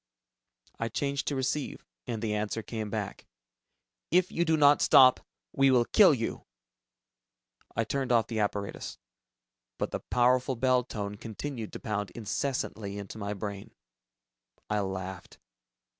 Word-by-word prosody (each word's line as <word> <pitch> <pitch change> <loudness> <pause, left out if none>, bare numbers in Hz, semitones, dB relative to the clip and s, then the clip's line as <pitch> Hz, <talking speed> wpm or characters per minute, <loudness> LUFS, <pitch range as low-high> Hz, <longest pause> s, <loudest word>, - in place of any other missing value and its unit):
I 115 - -1
changed 140 +4 -2
to 145 - 0
receive, 130 +2 -2 0.2
and 115 -1 -3
the 110 -1 0
answer 105 +1 -2
came 110 -2 -4
back, 100 -1 -5 0.8
"If 180 +2 +3
you 170 - +1
do 160 -1 +3
not 145 -1 +6
stop... 130 -2 +7 0.3
we 135 0 +4
will 125 -2 +4
kill 200 - +6
you!" 115 -6 -3 1.3
I 115 - +1
turned 130 +3 -2
off 115 -2 +4
the 115 -2 -3
apparatus, 100 -1 -3 0.8
but - - -2
the - - -2
powerful 125 +2 +2
bell 125 +1 +3
tone 105 -3 -5
continued 115 +2 -6
to - - -6
pound 105 -3 -3
incessantly 110 -3 -3
into 100 +2 -7
my 100 0 -3
brain. 100 0 -6 1.0
I 105 - +2
laughed. 95 -2 -5
115 Hz, 140 wpm, -29 LUFS, 105-130 Hz, 1.3 s, stop